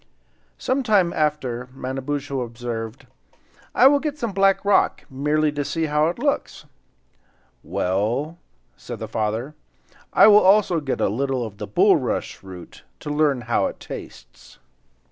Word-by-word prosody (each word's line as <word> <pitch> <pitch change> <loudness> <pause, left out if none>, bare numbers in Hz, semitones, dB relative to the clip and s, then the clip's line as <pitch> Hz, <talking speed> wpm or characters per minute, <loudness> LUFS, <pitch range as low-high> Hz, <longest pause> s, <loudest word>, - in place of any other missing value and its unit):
Some 260 +2 0
time 205 -8 +2
after 130 -5 -1
Manabozho 135 +1 -3
observed: 115 -1 -6 0.7
"I - - +5
will 285 +1 +6
get 295 0 -3
some 235 -6 -3
of - - -14
the 195 - -5
black 195 0 +3
rock, 205 - +2
merely 150 +3 +1
to 145 0 -3
see 165 +3 -2
how 150 0 +2
it 170 - -2
looks." - - -2 1.0
"Well," 120 - -1 0.4
said - - -8
the - - -6
father, 110 +6 -2 0.6
"I - - +6
will 210 -1 +8
also 190 -3 +4
get 140 -4 -3
a - - +3
little 130 +3 -1
of 105 -2 -10
the 105 - -5
bulrush 105 - +1
root, 90 -2 -11 0.2
to 150 - -5
learn 145 -4 +1
how 120 0 0
it - - -8
tastes." - - -11
145 Hz, 150 wpm, -22 LUFS, 120-170 Hz, 1.0 s, will